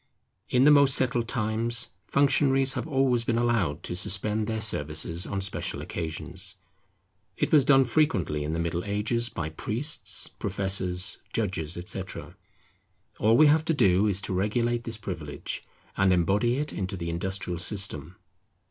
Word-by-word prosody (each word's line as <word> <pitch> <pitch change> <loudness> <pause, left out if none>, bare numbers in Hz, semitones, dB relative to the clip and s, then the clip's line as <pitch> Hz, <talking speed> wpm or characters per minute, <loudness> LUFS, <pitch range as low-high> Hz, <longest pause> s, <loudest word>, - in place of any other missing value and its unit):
In 125 +1 +3
the 150 - +7
most 140 -2 +6
settled 125 -2 +1
times 115 0 0 0.2
functionaries 135 -1 +2
have - - -4
always 135 -5 +2
been 115 0 0
allowed 105 -10 0
to - - -4
suspend 105 +4 -1
their 110 -1 -2
services 85 -3 0
on 100 -1 -3
special 95 - -3
occasions. 80 -1 -4 0.8
It - - -1
was 150 -3 +6
done 135 -2 +5
frequently 115 - 0
in 75 +2 -3
the 80 - -2
Middle 85 +1 -2
Ages 110 +4 -1
by 80 -6 -4
priests, 115 - -1
professors, 95 -2 -1
judges, 90 -7 -2
etc. 90 +1 -5 0.8
All 110 +2 +4
we 155 - +7
have 155 +1 +4
to 165 - +1
do 100 -5 +3
is 100 -1 0
to 95 - -3
regulate 115 +5 0
this 115 -2 -5
privilege, 75 -9 -6 0.3
and 95 0 +3
embody 100 +7 +2
it 150 +1 -2
into 95 0 -4
the 85 -1 -4
industrial 90 0 -2
system. 90 -4 +1
105 Hz, 150 wpm, -26 LUFS, 90-120 Hz, 0.8 s, the